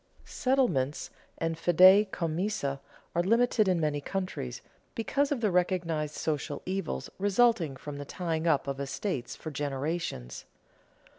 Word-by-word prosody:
Settlements 240 - 0 0.3
and 165 -1 -2
fidei 185 +5 +7
commissa 165 -4 -2 0.3
are 170 - +2
limited 230 +2 +3
in 180 -2 +2
many 150 -2 0
countries, 185 - -4 0.3
because 275 +5 0
of 270 -5 0
the 210 -4 +2
recognized 170 -4 0
social 150 -1 -3
evils 185 - -3
resulting 200 - +3
from 145 +2 -7
the 145 - -5
tying 165 +1 -2
up 155 -4 +3
of 140 0 -3
estates 140 - -3
for 155 - -7
generations. 145 - -3
165 Hz, 130 wpm, -29 LUFS, 145-195 Hz, 0.3 s, fidei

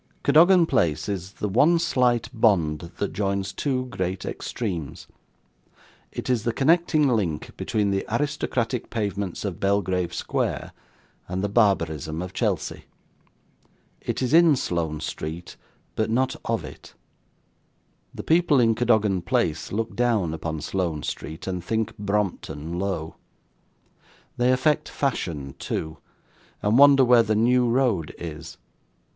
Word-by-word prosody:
Cadogan 175 +2 +6
Place 80 - +1
is 95 -1 -4
the 105 - -3
one 145 - +4
slight 125 -8 +1
bond 85 -9 +1
that 100 - -2
joins 100 -1 -1
two 130 0 -1
great 95 -6 -4
extremes; 90 - -5 1.1
it - - -6
is 125 -3 +1
the 115 - 0
connecting 155 +2 +3
link 100 - -1
between 105 -2 -1
the 95 0 0
aristocratic 120 -2 -1
pavements 100 -4 -3
of 95 -5 -4
Belgrave 95 -3 0
Square, - - -2 0.6
and 95 +2 -3
the 100 - 0
barbarism 85 - +1
of 90 - -8
Chelsea. - - -2 1.2
It - - -3
is 125 - -1
in 165 -2 +6
Sloane 80 - -2
Street, 80 +3 -6 0.4
but 110 0 0
not 130 +3 +1
of 115 -6 -1
it. 75 - -12 1.2
The - - -8
people 165 -4 +3
in 115 -2 +4
Cadogan 110 -5 +2
Place 100 - -1
look 110 +3 -3
down 110 -9 +1
upon 80 -1 -4
Sloane 85 -2 -2
Street, 80 +2 -6
and 90 -2 -3
think 110 +3 -2
Brompton 95 -5 -2
low. 90 -5 -3 1.2
They 125 +1 +3
affect 150 +4 +1
fashion 80 - -3
too, 80 0 -4 0.6
and 105 +5 +3
wonder 140 -2 +7
where 120 -1 +6
the 110 -1 0
New 120 +2 +3
Road 115 - +1
is. 80 0 -8
105 Hz, 130 wpm, -24 LUFS, 85-125 Hz, 1.2 s, wonder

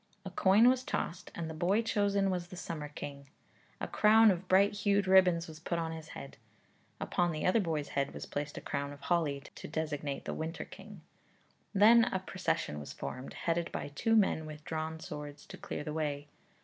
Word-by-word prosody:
A 190 - -5
coin 200 +7 +5
was 255 0 +4
tossed 175 -8 -3
and 170 -1 -3
the 160 - -5
boy 185 +8 +2
chosen 200 -3 +1
was 180 -1 -2
the 180 - -10
summer 155 -4 -5
king; 140 -1 -8 0.5
a - - -3
crown 220 0 +6
of 185 0 -3
bright 195 +2 +5
hued 205 -1 +2
ribbons 185 -3 +5
was 155 -1 -10
put 170 +1 -2
upon 165 -1 -2
his 160 -1 -7
head. 140 - -9 0.6
Upon 175 -1 0
the 155 -1 -3
other 185 +5 +4
boy's 160 -7 -1
head 140 0 -1
was - - -7
placed 145 0 -4
a - - -5
crown 140 0 -3
of 140 - -14
holly, 150 -6 0
to - - -8
designate 150 -2 -3
the - - -3
winter 160 +2 -4
king. 200 -2 -12 0.7
Then 225 +3 +7
a 220 - -1
procession 130 - -2
was 75 - -7
formed, 130 - -6
headed 170 0 0
by - - -4
two 225 +11 +1
men 190 -7 +3
with 155 -1 -9
drawn 160 0 -3
swords 150 -2 -8
to - - -10
clear - - -5
the 150 0 -4
way. 145 -2 -2
165 Hz, 200 wpm, -32 LUFS, 150-195 Hz, 0.7 s, Then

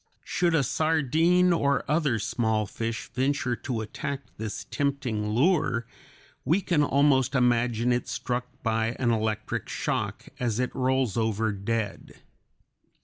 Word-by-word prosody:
Should 175 -2 +1
a 150 - +3
sardine 160 +5 +3
or 140 -5 +1
other 150 -6 +2
small 110 0 0
fish 115 +2 -4
venture 130 -1 0
to 120 -5 -3
attack 135 +5 -4 0.2
this 110 -1 -4
tempting 130 -7 -1
lure, 125 - +2 0.6
we 170 +5 +3
can 175 -6 +1
almost 140 -2 +3
imagine 120 -1 +2
it 120 - -1
struck 125 0 -2 0.2
by 115 0 0
an 120 -2 +1
electric 110 -1 -2
shock, - - -2
as 120 -2 -1
it 125 - -1
rolls 130 -4 +1
over 110 -1 +1
dead. 105 +1 -3
125 Hz, 130 wpm, -27 LUFS, 115-140 Hz, 0.6 s, a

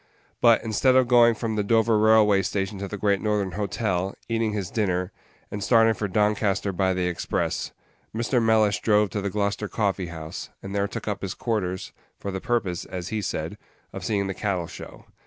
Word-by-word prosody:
But, 115 -1 +5
instead 120 +4 +2
of 130 -1 +5
going 120 -1 +6
from 110 -1 -3
the 105 - +1
Dover 115 +1 +3
Railway 105 -2 +5
Station 95 +1 -2
to 100 - -4
the 105 - -6
Great 100 -1 +1
Northern 105 -3 0
Hotel, 95 -1 -2
eating 115 -1 0
his 100 -4 -4
dinner, 90 -4 -1 0.4
and 105 -1 -4
starting 115 +1 +5
for 105 - -3
Doncaster 105 0 +1
by 95 +1 +1
the 90 -1 0
express, 90 -2 -2 0.4
Mr. 120 +2 0
Mellish 110 -2 +3
drove 105 -2 +3
to 105 - -2
the 100 - -2
Gloucester 100 +1 -1
Coffee 100 -4 -1
house, 80 -2 -7
and 100 - -6
there 100 0 +1
took - - -7
up 105 - -2
his 95 -1 -4
quarters, 95 -6 -2 0.3
for 100 - -5
the 95 0 -4
purpose, 100 -8 -1
as 90 -1 -6
he 110 0 -2
said, 95 - -4 0.3
of - - -6
seeing 100 -2 0
the 95 - -3
Cattle 95 -4 -2
show. - - -11
105 Hz, 195 wpm, -25 LUFS, 95-110 Hz, 0.4 s, going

